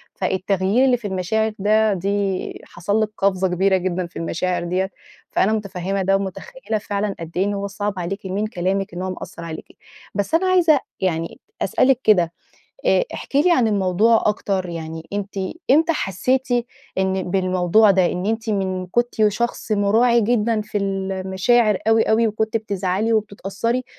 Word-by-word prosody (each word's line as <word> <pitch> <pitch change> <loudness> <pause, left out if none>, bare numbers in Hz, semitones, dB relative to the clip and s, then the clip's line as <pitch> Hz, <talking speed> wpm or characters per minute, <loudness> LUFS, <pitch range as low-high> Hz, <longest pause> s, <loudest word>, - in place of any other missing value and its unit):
فالتغيير 190 +5 +1
اللي 250 -2 +3
في 220 -3 -6
المشاعر 210 +4 0
ده 215 +1 +3
دي 195 0 -2
حصل 200 +5 -1
لك 215 - 0
قفزة 190 -1 +2
كبيرة 190 +2 +2
جدًا 180 -1 -2
في 170 - -9
المشاعر 175 +2 -1
ديّة. 185 +2 -1 0.4
فأنا 215 +3 +2
مُتفهّمة 195 -2 -2
ده، 195 +1 +2
ومُتخيّلة 220 - -4
فعلًا 205 -1 -2
قد 165 0 -7
إيه 190 - +3
إن 205 - -1
هو 200 0 -3
صعب 205 0 -3
عليكِ 190 +3 -4
من 200 +3 -1
كلامِك 190 -2 -2
إن 175 - -5
هو 185 - -2
مأثّر 175 -2 -7
عليكِ. 160 -1 -8 0.4
بس 200 +6 -2
أنا 370 +3 +2
عايزة 340 -6 +4 0.2
يعني 165 +2 -2 0.2
أسألِك 260 -1 +3
كده 175 -6 +3 0.5
آآ - - +4
احكِ - - -5
لي 345 +5 +5
عن 240 -8 +3
الموضوع 205 +3 +3
أكتر، 195 -3 0
يعني 165 -1 -6
أنتِ 205 0 -4 0.4
إمتى 320 +4 +5
حسّيتِ 255 - -1 0.5
إن 190 -1 0
بالموضوع 185 +2 +3
ده، 185 -2 +4
إن 180 +3 -2
أنتِ 225 0 -1
من 190 -2 -1
كنتِ 240 +6 0
شخص 225 +1 -2
مُراعي 225 +4 +3
جدًا 225 0 +1
في 210 0 -3
المشاعر 195 +3 +1
أوي، 225 0 +5
أوي. 225 +1 +3
وكنتِ 220 +1 -1
بتزعلي، 205 0 -1
وبتتأثّري. 215 +3 -1
200 Hz, 160 wpm, -21 LUFS, 185-220 Hz, 0.5 s, لي